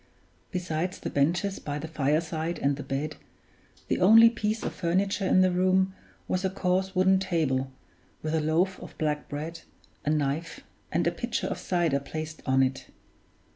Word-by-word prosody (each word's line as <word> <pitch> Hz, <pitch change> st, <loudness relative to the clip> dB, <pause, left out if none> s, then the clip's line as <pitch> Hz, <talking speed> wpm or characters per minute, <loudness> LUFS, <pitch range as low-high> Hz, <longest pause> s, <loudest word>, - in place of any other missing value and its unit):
Besides 180 Hz, 0 st, -2 dB
the -, -, -5 dB
benches 175 Hz, +7 st, +1 dB
by 145 Hz, -1 st, -4 dB
the 155 Hz, +2 st, -5 dB
fireside 160 Hz, +2 st, -1 dB
and 140 Hz, 0 st, +1 dB
the 145 Hz, -, -6 dB
bed, 140 Hz, +3 st, -3 dB, 0.7 s
the -, -, 0 dB
only 225 Hz, +5 st, +8 dB
piece 215 Hz, -1 st, -2 dB
of -, -, -3 dB
furniture 190 Hz, +3 st, 0 dB
in 185 Hz, -, +5 dB
the 185 Hz, 0 st, +4 dB
room 185 Hz, +1 st, +2 dB, 0.3 s
was 185 Hz, +1 st, -1 dB
a 190 Hz, -, +2 dB
coarse 190 Hz, 0 st, 0 dB
wooden 190 Hz, +1 st, +4 dB
table, 145 Hz, -8 st, 0 dB, 0.5 s
with 155 Hz, 0 st, -2 dB
a 160 Hz, -, +2 dB
loaf 170 Hz, +5 st, +1 dB
of -, -, -11 dB
black 150 Hz, -1 st, -1 dB
bread, 160 Hz, +3 st, -5 dB, 0.4 s
a -, -, -1 dB
knife, 150 Hz, +2 st, -1 dB, 0.3 s
and -, -, +1 dB
a -, -, +3 dB
pitcher -, -, -3 dB
of -, -, -3 dB
cider 170 Hz, -6 st, +1 dB
placed 155 Hz, +2 st, -6 dB
on 130 Hz, 0 st, +4 dB
it. 130 Hz, 0 st, -2 dB
165 Hz, 170 wpm, -27 LUFS, 150-185 Hz, 0.7 s, only